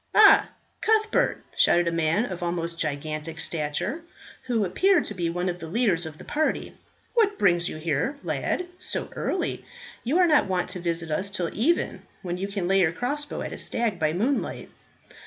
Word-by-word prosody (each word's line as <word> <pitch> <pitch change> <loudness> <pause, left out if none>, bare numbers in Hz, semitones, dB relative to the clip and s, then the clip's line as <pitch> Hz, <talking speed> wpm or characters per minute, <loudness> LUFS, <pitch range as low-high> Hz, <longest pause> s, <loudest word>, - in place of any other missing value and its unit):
"Ah, - - +7 0.3
Cuthbert," 435 +3 +2
shouted 175 0 +4
a - - +2
man 165 +6 +1
of 185 -6 -6
almost 170 -1 -2
gigantic 155 +2 -3
stature, 165 - -2 0.5
who 230 -5 +1
appeared 355 - +3
to - - -3
be 175 -3 -1
one 175 +2 -2
of 180 -1 -2
the 165 - -7
leaders 180 -4 +1
of 155 -1 -9
the - - -11
party, 310 +1 -1 0.4
"what 425 -4 +3
brings 175 -3 +3
you - - -6
here, 160 - -1
lad, 360 - -1
so 360 - -1
early? - - -2 0.4
You 270 +8 +1
are 365 - +6
not 305 - +4
wont 185 -2 -1
to 180 - -4
visit 170 -2 -2
us 190 +6 0
till 180 -4 -2
even, 315 +11 +1 0.2
when 175 -1 -3
you 195 +2 -3
can 200 -3 -3
lay 195 +1 +4
your 170 -4 +4
crossbow 290 - -3
at - - -5
a - - -5
stag 225 -6 0
by 155 -1 +2
moonlight." 230 - -1
180 Hz, 185 wpm, -26 LUFS, 165-245 Hz, 0.5 s, Ah